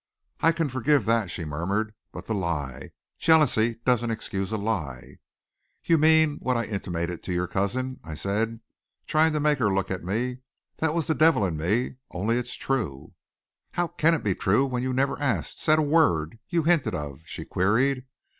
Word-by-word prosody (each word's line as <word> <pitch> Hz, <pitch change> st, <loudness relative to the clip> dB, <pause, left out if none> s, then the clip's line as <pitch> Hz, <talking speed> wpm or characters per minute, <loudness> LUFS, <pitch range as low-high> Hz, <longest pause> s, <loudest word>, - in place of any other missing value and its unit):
"I 165 Hz, -, +4 dB
can 165 Hz, -1 st, -1 dB
forgive 135 Hz, +2 st, +1 dB
that," 115 Hz, -4 st, +1 dB
she 80 Hz, 0 st, -5 dB
murmured. 95 Hz, +9 st, -2 dB, 0.2 s
"But -, -, -9 dB
the 110 Hz, -, -2 dB
lie. 75 Hz, -9 st, -3 dB, 0.3 s
Jealousy 140 Hz, -8 st, +4 dB
doesn't 120 Hz, -2 st, +2 dB
excuse 100 Hz, -3 st, -3 dB
a 110 Hz, -, 0 dB
lie." 85 Hz, -, -4 dB, 0.6 s
"You 165 Hz, -2 st, +3 dB
mean 160 Hz, -1 st, +4 dB
what 125 Hz, -1 st, 0 dB
I 120 Hz, -, 0 dB
intimated 90 Hz, -5 st, -3 dB
to -, -, -5 dB
your 90 Hz, 0 st, 0 dB
cousin," 130 Hz, +8 st, -2 dB
I 80 Hz, -2 st, -7 dB
said, 110 Hz, +6 st, -2 dB, 0.4 s
trying 160 Hz, +1 st, +3 dB
to 150 Hz, -, 0 dB
make 150 Hz, -1 st, +2 dB
her 110 Hz, -5 st, +2 dB
look 95 Hz, 0 st, -1 dB
at 95 Hz, -, -3 dB
me. 120 Hz, +7 st, -2 dB, 0.4 s
"That 160 Hz, 0 st, 0 dB
was 165 Hz, -3 st, 0 dB
the 160 Hz, -, +1 dB
devil 155 Hz, -6 st, +4 dB
in 85 Hz, -4 st, -2 dB
me. 105 Hz, +12 st, -1 dB
Only 105 Hz, +7 st, 0 dB
it's 125 Hz, 0 st, -4 dB
true." 105 Hz, -, -3 dB, 0.6 s
"How 175 Hz, -1 st, 0 dB
can 165 Hz, +3 st, +3 dB
it -, -, -4 dB
be 100 Hz, -, +1 dB
true 100 Hz, +9 st, +2 dB
when 125 Hz, -2 st, -2 dB
you 130 Hz, +1 st, -1 dB
never 135 Hz, +2 st, 0 dB
asked 120 Hz, -, -1 dB
said 155 Hz, 0 st, +4 dB
a 155 Hz, -, +3 dB
word 115 Hz, -, +2 dB
you 170 Hz, -2 st, +1 dB
hinted 150 Hz, -, +2 dB
of?" 75 Hz, -2 st, -6 dB
she -, -, -7 dB
queried. 125 Hz, +7 st, +1 dB
115 Hz, 185 wpm, -26 LUFS, 95-145 Hz, 0.6 s, I